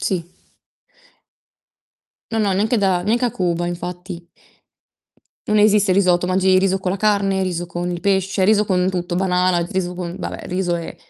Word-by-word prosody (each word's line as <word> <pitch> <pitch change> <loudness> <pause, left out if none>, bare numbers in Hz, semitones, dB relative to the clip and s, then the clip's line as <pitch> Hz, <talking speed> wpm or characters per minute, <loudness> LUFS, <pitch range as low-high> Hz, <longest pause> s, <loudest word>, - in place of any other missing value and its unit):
Sì. 180 -3 -1 2.1
No, 225 - 0
no, 205 -2 +1
neanche 220 +5 +1
da 190 -3 +1
neanche 235 +4 +1
a 240 - -1
Cuba 175 -1 -1
infatti. 175 0 -6 1.2
Non 215 - +2
esiste 210 -2 +4
il 185 - +2
risotto, 180 -2 +3
mangi 185 +1 +3
riso 190 0 +1
con 185 -1 -2
la 195 - -2
carne, 200 -2 +1
riso 175 -2 -3
con 175 +1 -4
il 175 - -4
pesce, 190 -1 +1
riso 210 0 +4
con 185 -2 +1
tutto, 175 -1 -3
banana, 180 -1 +1
riso 185 -2 -2
con 175 -1 -5
vabbè - - -6
riso 180 -1 -1
e 165 - -7
185 Hz, 170 wpm, -20 LUFS, 175-195 Hz, 2.1 s, esiste